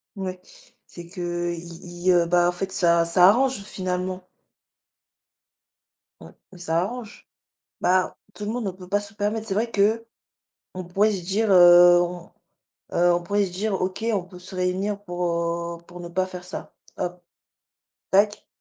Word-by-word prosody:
Ouais, 185 Hz, -2 st, -5 dB, 0.5 s
c'est 170 Hz, -1 st, -11 dB
que, 175 Hz, -2 st, -3 dB
i 170 Hz, 0 st, -9 dB, 0.3 s
ils, -, -, +7 dB
heu, 175 Hz, -1 st, +4 dB
bah, 175 Hz, 0 st, +3 dB
en -, -, 0 dB
fait 190 Hz, +2 st, -5 dB
ça 170 Hz, -3 st, +3 dB
ça 180 Hz, +2 st, +6 dB
arrange 255 Hz, 0 st, +2 dB
finalement. 185 Hz, -1 st, -4 dB, 1.9 s
Ouais, -, -, -12 dB, 0.2 s
et 185 Hz, -, -12 dB
ça 165 Hz, -1 st, 0 dB
arrange. 225 Hz, +2 st, -7 dB, 0.5 s
Bah, 185 Hz, 0 st, +2 dB, 0.2 s
tout 210 Hz, -, -7 dB
le 210 Hz, -, -2 dB
monde 240 Hz, -1 st, -3 dB
ne 195 Hz, -, -1 dB
peut 180 Hz, 0 st, -13 dB
pas 205 Hz, +1 st, +2 dB
se 205 Hz, +1 st, -10 dB
permettre. 215 Hz, +2 st, -2 dB
C'est 195 Hz, -, -2 dB
vrai 230 Hz, +4 st, -1 dB
qu'on 225 Hz, +3 st, 0 dB, 0.6 s
pourrait 205 Hz, +5 st, +2 dB
se 190 Hz, -3 st, -3 dB
dire, 205 Hz, +4 st, 0 dB
heu, 175 Hz, -1 st, +8 dB
on, 175 Hz, 0 st, -5 dB, 0.6 s
heu, 175 Hz, 0 st, +4 dB
on 175 Hz, 0 st, -1 dB
pourrait 205 Hz, +3 st, +1 dB
se 180 Hz, -, -7 dB
dire: 200 Hz, +3 st, -2 dB
«OK, 185 Hz, +4 st, -3 dB
on 195 Hz, -4 st, 0 dB
peut 180 Hz, 0 st, -13 dB
se 185 Hz, +1 st, -10 dB
réunir 190 Hz, +3 st, -1 dB
pour, 180 Hz, -2 st, -4 dB, 0.6 s
heu, -, -, -23 dB
pour 175 Hz, 0 st, -11 dB
ne 175 Hz, -, -8 dB
pas 185 Hz, +2 st, 0 dB
faire 180 Hz, -1 st, -9 dB
ça». 180 Hz, -, -8 dB, 0.2 s
Hop! 180 Hz, -1 st, -4 dB, 0.9 s
Tac. 205 Hz, +2 st, +2 dB
185 Hz, 170 wpm, -24 LUFS, 175-205 Hz, 1.9 s, heu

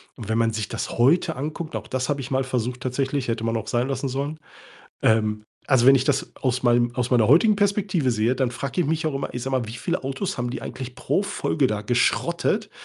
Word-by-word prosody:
Und 110 Hz, -4 st, -9 dB
wenn 110 Hz, -, +1 dB
man 115 Hz, -1 st, +2 dB
sich 110 Hz, -2 st, -2 dB
das -, -, -4 dB
heute 160 Hz, +5 st, +3 dB
anguckt, 155 Hz, +4 st, -5 dB
und -, -, 0 dB
auch -, -, -13 dB
das 130 Hz, -1 st, -2 dB
habe 145 Hz, -1 st, -1 dB
ich 125 Hz, -, -7 dB
mal 135 Hz, 0 st, +1 dB
versucht 125 Hz, -1 st, -2 dB
tatsächlich, 135 Hz, +1 st, -1 dB
hätte 115 Hz, -1 st, -2 dB
man 115 Hz, 0 st, 0 dB
auch 110 Hz, -, -5 dB
sein 120 Hz, +2 st, 0 dB
lassen 135 Hz, +1 st, -2 dB
sollen 140 Hz, +4 st, -3 dB, 0.6 s
ähm, 110 Hz, -1 st, +2 dB, 0.2 s
also, 130 Hz, -2 st, +4 dB
wenn 135 Hz, -, +9 dB
ich 130 Hz, -, +2 dB
das 140 Hz, -1 st, 0 dB
aus 130 Hz, -1 st, 0 dB
meinem 120 Hz, 0 st, +3 dB
aus 125 Hz, -1 st, -1 dB
meiner 115 Hz, -4 st, +4 dB
heutigen 200 Hz, -, +5 dB
Perspektive 195 Hz, -9 st, +1 dB
sehe, 115 Hz, +3 st, +1 dB
dann 125 Hz, -2 st, 0 dB
frage 135 Hz, +7 st, -2 dB
ich -, -, 0 dB
mich 160 Hz, 0 st, 0 dB
auch 140 Hz, -, -3 dB
immer, 135 Hz, -, -4 dB
ich 125 Hz, -, -4 dB
sage 135 Hz, 0 st, 0 dB
mal, 115 Hz, -3 st, -3 dB
wie 110 Hz, -, -7 dB
viele 170 Hz, +6 st, -3 dB
Autos 135 Hz, +8 st, -3 dB
haben 120 Hz, 0 st, -2 dB
die -, -, -5 dB
eigentlich 130 Hz, -1 st, -7 dB
pro 200 Hz, -, 0 dB
Folge 150 Hz, -7 st, 0 dB
da 105 Hz, -1 st, -2 dB
geschrottet? 170 Hz, -, +1 dB
130 Hz, 245 wpm, -24 LUFS, 120-145 Hz, 0.6 s, wenn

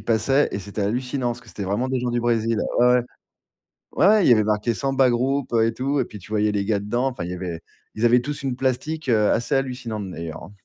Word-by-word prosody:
passait 115 Hz, +7 st, +2 dB
et 100 Hz, -, -2 dB
c'était 100 Hz, +2 st, -6 dB
hallucinant. 125 Hz, +5 st, -1 dB
Parce 120 Hz, 0 st, -5 dB
que -, -, -18 dB
c'était 100 Hz, -, -6 dB
vraiment 105 Hz, +7 st, -1 dB
des 130 Hz, -1 st, -1 dB
gens, 125 Hz, -, -2 dB
du 120 Hz, -, 0 dB
Brésil. 115 Hz, -1 st, +1 dB, 0.2 s
Ouais, 120 Hz, -, +5 dB
ouais. 125 Hz, 0 st, +4 dB, 1.0 s
Ouais 210 Hz, -1 st, +5 dB
il -, -, +5 dB
y -, -, +9 dB
avait 110 Hz, -2 st, +3 dB
marqué 105 Hz, +2 st, 0 dB
samba 135 Hz, 0 st, +2 dB
groupe, 130 Hz, +2 st, 0 dB
heu 115 Hz, -1 st, +4 dB
et 115 Hz, -, -1 dB
tout. 135 Hz, +3 st, 0 dB
Et -, -, -1 dB
puis 105 Hz, -, -11 dB
tu 95 Hz, +3 st, -15 dB
voyais 105 Hz, 0 st, +2 dB
les 100 Hz, -1 st, -1 dB
gars 105 Hz, -1 st, +1 dB
dedans, 120 Hz, +6 st, -1 dB
enfin 120 Hz, -9 st, -4 dB
il 85 Hz, -, -5 dB
y -, -, -3 dB
avait 90 Hz, -2 st, -5 dB, 0.3 s
ils 110 Hz, -, -4 dB
avaient 120 Hz, +1 st, +5 dB
tous 145 Hz, +2 st, -5 dB
une 130 Hz, -2 st, -2 dB
plastique, 135 Hz, +4 st, -2 dB
heu, 105 Hz, -3 st, +3 dB
assez 120 Hz, +5 st, 0 dB
hallucinante 125 Hz, -7 st, -3 dB
d'ailleurs 80 Hz, -2 st, -7 dB
hein. 90 Hz, -, -11 dB
120 Hz, 255 wpm, -23 LUFS, 105-130 Hz, 1.0 s, y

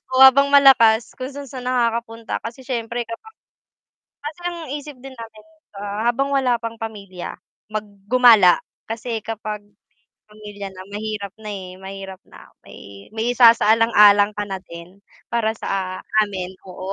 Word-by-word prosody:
o 260 Hz, -, +6 dB
habang 275 Hz, +1 st, +8 dB
malakas 245 Hz, -5 st, +6 dB
kung 260 Hz, +1 st, -5 dB
san-san 270 Hz, -3 st, -8 dB
nakakapunta 230 Hz, -2 st, -1 dB
kasi 230 Hz, +3 st, -8 dB
siyempre 235 Hz, -1 st, -3 dB
kapag, 440 Hz, -, -10 dB, 0.9 s
kasi 305 Hz, +4 st, -6 dB
ang 345 Hz, -1 st, -7 dB
isip 295 Hz, -1 st, -7 dB
din 270 Hz, 0 st, -10 dB
namin, 220 Hz, -2 st, -11 dB, 0.3 s
ah, 205 Hz, +3 st, -2 dB
habang 275 Hz, +3 st, 0 dB
wala 255 Hz, -3 st, +2 dB
pang 230 Hz, -1 st, -5 dB
pamilya 200 Hz, -5 st, -7 dB, 0.4 s
mag 215 Hz, 0 st, -2 dB, 0.2 s
gumala 230 Hz, -8 st, +7 dB, 0.3 s
kasi 230 Hz, 0 st, -4 dB
kapag 215 Hz, -1 st, -5 dB, 0.7 s
may 210 Hz, -, -17 dB
pamilya 205 Hz, -1 st, -8 dB
na 185 Hz, 0 st, -11 dB
mahirap 210 Hz, -2 st, -5 dB
na, 210 Hz, -, -7 dB
eh, 190 Hz, -3 st, -6 dB
mahirap 190 Hz, -1 st, -8 dB
na -, -, -15 dB, 0.3 s
may -, -, -13 dB, 0.3 s
may 220 Hz, 0 st, -3 dB
isasaalang-alang 220 Hz, -3 st, +6 dB
ka 205 Hz, -, -2 dB
na 190 Hz, -, -4 dB
din 170 Hz, +3 st, -12 dB, 0.3 s
para 230 Hz, -2 st, +1 dB
sa 185 Hz, -2 st, -3 dB, 0.2 s
amin 185 Hz, -3 st, -5 dB, 0.2 s
oo. 185 Hz, +1 st, -6 dB
225 Hz, 145 wpm, -21 LUFS, 205-250 Hz, 0.9 s, habang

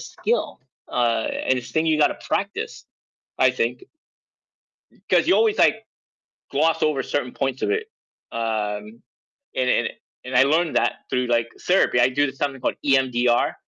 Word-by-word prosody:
skill, 475 Hz, +2 st, -2 dB, 0.3 s
uh, 120 Hz, -2 st, +1 dB
and 130 Hz, -, 0 dB
it's 125 Hz, -, -8 dB
a -, -, -19 dB
thing 160 Hz, 0 st, +1 dB
you 155 Hz, -1 st, +2 dB
gotta 150 Hz, -, +2 dB
practice, -, -, -3 dB, 0.5 s
I 130 Hz, -, +5 dB
think 125 Hz, -1 st, -2 dB, 1.2 s
'cause -, -, +3 dB
you -, -, +5 dB
always, 440 Hz, -2 st, +2 dB
like, -, -, +3 dB, 0.7 s
gloss 160 Hz, +3 st, +2 dB
over 145 Hz, -4 st, +1 dB
certain 125 Hz, -4 st, -2 dB
points 135 Hz, -1 st, -3 dB
of -, -, 0 dB
it, 445 Hz, 0 st, -1 dB, 0.4 s
um, 110 Hz, -1 st, -3 dB, 0.5 s
and 125 Hz, -1 st, +1 dB
and -, -, +2 dB, 0.3 s
and 125 Hz, 0 st, -6 dB
I 125 Hz, -, +7 dB
learned 160 Hz, +4 st, +1 dB
that -, -, +2 dB
through, 125 Hz, -1 st, 0 dB
like, 115 Hz, -1 st, +1 dB
therapy. 180 Hz, -9 st, +3 dB
I 120 Hz, +1 st, +5 dB
do 145 Hz, +1 st, +1 dB
something 135 Hz, -1 st, -3 dB
called -, -, -1 dB
EMDR, 125 Hz, -3 st, +2 dB
130 Hz, 160 wpm, -23 LUFS, 120-150 Hz, 1.2 s, I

